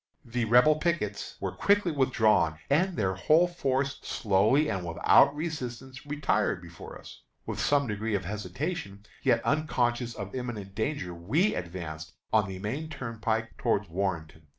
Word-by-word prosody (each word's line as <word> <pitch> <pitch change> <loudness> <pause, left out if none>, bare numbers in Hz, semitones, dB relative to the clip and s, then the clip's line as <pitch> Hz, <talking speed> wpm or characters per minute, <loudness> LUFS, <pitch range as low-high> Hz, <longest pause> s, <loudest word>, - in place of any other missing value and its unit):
The 120 0 -1
Rebel 125 +7 +5
pickets 155 - -2
were - - -2
quickly 200 -3 +2
withdrawn, 110 - +2
and 180 +5 +2
their 95 -3 +1
whole 155 - +4
force 140 -5 -1
slowly 110 +8 +2
and 95 -9 -2
without 85 - +4
resistance 130 -4 -6
retired 135 -9 0
before 85 -2 -10
us. - - -13 0.2
With - - -4
some 145 -1 +2
degree 105 -1 -2
of 95 -3 -2
hesitation, 100 - -4 0.2
yet - - +2
unconscious 125 -5 0
of 100 0 -7
imminent 115 -6 -5
danger, 110 -4 -2
we 130 - +1
advanced 85 -2 -6 0.2
on 105 -3 +4
the 95 - -5
main 130 +11 -4
turnpike 115 -5 -3
toward 105 -6 0
Warrenton. 80 -4 -3
115 Hz, 145 wpm, -28 LUFS, 95-145 Hz, 0.2 s, Rebel